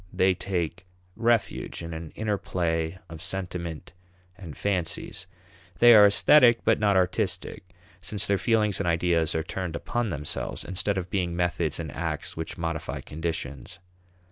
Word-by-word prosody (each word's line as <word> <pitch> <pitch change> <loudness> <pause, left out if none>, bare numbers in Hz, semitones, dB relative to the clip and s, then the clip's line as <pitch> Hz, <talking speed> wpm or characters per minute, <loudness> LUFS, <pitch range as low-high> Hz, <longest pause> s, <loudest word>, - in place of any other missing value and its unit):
They 95 0 +3
take 90 -1 -3 0.3
refuge 115 -6 0
in 85 0 -6
an 80 0 -6
inner 105 -2 -1
play 80 -1 -1
of 80 -2 -9
sentiment 90 -4 -4 0.4
and 90 -6 -10
fancies. 95 0 -2 0.5
They 120 +5 +8
are 105 -2 +9
aesthetic 120 +3 +6
but - - +3
not 105 -2 +3
artistic, 90 -1 -1 0.4
since 100 +2 -2
their 100 -1 +1
feelings 105 -1 +1
and 100 - -1
ideas 85 -2 +1
are 80 - 0
turned 90 -1 -4
upon 120 +6 -2
themselves, 75 -4 -4
instead 95 +2 -1
of 90 -1 -4
being 90 -3 -1
methods 85 -3 0
in 80 -4 -5
acts - - -4
which 80 - -5
modify 80 -2 -3
conditions. 80 0 -5
90 Hz, 145 wpm, -26 LUFS, 80-100 Hz, 0.5 s, are